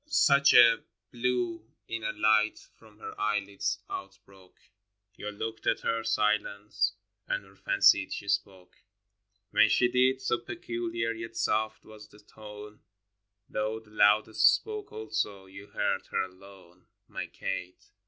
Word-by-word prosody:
hi. - - -31
Such 140 - +5
a 120 -1 +8 0.3
blue 120 -2 -1 0.2
inner 115 -1 -3
light 110 0 +2
from 110 -2 -20
her - - -8
eyelids 105 -2 -1
outbroke, 95 -1 -10 0.6
You 105 - -6
looked 110 +2 -6
at - - +1
her 115 0 -1
silence 105 -2 0 0.3
and - - -2
fancied 95 -1 +4
she 100 - -5
spoke: 95 -2 -3 0.7
When 110 +1 +5
she 120 +2 +3
did, 130 +1 +3
so 120 - 0
peculiar 115 -1 -4
yet 115 0 -7
soft 110 0 -1
was 105 -1 -13
the 105 - -19
tone, 105 0 -12 0.7
Though 110 +1 -2
the 110 -1 -21
loudest 105 +1 +5
spoke 430 -2 -7
also, 105 -3 -3
you 100 +2 -12
heard - - -2
her - - 0
alone 95 -1 -14
— - - -54
My - - -5
Kate. 90 -1 -6
110 Hz, 135 wpm, -29 LUFS, 100-115 Hz, 0.7 s, a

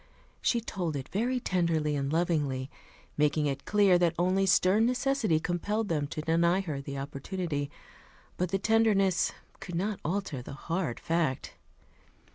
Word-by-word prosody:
She 235 - +2
told 175 -8 -3
it 135 -1 -5
very 245 +6 0
tenderly 170 -8 0
and 140 0 -1
lovingly, 150 -6 0 0.5
making 150 +1 +2
it 140 -1 -2
clear 200 -4 +4
that 170 -2 +2
only 185 +3 +2
stern 190 +3 +4
necessity 250 - +1
compelled 205 +6 -1
them 150 -4 0
to 155 - -5
deny 170 +3 +3
her 155 -7 -4
the 140 0 -6
opportunity; 145 +2 -3 0.7
but 180 0 -1
the 195 - +1
tenderness 200 -4 +3 0.3
could 175 -3 -7
not 200 +4 -1
alter 165 -5 -2
the 125 - -9
hard 165 -2 -3
fact. 165 -5 -1
170 Hz, 145 wpm, -29 LUFS, 150-195 Hz, 0.7 s, clear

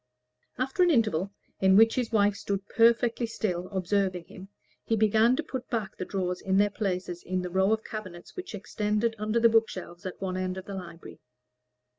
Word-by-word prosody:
After 265 +7 -1
an 355 - +6
interval, 205 - +2 0.3
in 190 0 +5
which 225 +2 +6
his 245 -3 -1
wife 205 -2 +3
stood 200 -1 -3
perfectly 235 +1 +3
still, 185 -5 -2
observing 190 -2 -1
him, 190 +1 -12 0.3
he 225 - 0
began 220 +3 +4
to 320 - -2
put 260 -5 -6
back 215 -5 -3
the 185 - -5
drawers 180 -2 -2
in 190 0 +1
their 205 +1 +4
places 180 -4 -3
in 185 0 -2
the 180 - -5
row 190 +2 +2
of 220 0 +1
cabinets 185 -6 -8
which 370 - -6
extended 210 +2 -1
under 215 +2 0
the 230 - +6
bookshelves 190 -6 0
at 185 - -8
one 185 -1 -3
end 185 0 -2
of 190 - -7
the 200 - -7
library. 175 -3 -9
205 Hz, 190 wpm, -28 LUFS, 185-225 Hz, 0.3 s, an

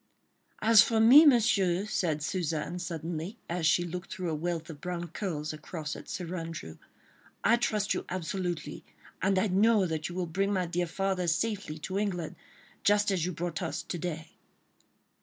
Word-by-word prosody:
"As 220 -1 +8
for 225 +1 +2
me, 265 +8 +9
Monsieur," 200 -8 +3
said 160 -8 -1
Suzanne, 165 0 -2
suddenly, 170 +3 -4
as 170 -2 0
she 175 +1 +4
looked 180 +1 -6
through 180 -3 -3
a - - -1
wealth 165 +1 -2
of 145 - -12
brown 175 -1 -4
curls 155 -4 -3
across 155 0 -6
at - - -10
Sir 180 -1 -4
Andrew, 165 - -6 0.6
"I 235 - +5
trust 210 -3 0
you - - -3
absolutely, 180 -1 -3 0.4
and 190 0 +2
I 185 - +3
know 205 +2 +4
that 160 -2 -3
you 175 - -7
will 180 -1 -1
bring 195 +4 -1
my 185 -3 +1
dear 175 +1 -1
father 190 +1 -1
safely 190 -2 -1
to 190 +4 -2
England, 180 -6 -2 0.5
just 205 0 +3
as 180 -3 0
you - - -2
brought 175 0 -4
us 170 - -3
to 175 - -4
day." 160 -2 -5
180 Hz, 175 wpm, -29 LUFS, 165-195 Hz, 0.6 s, me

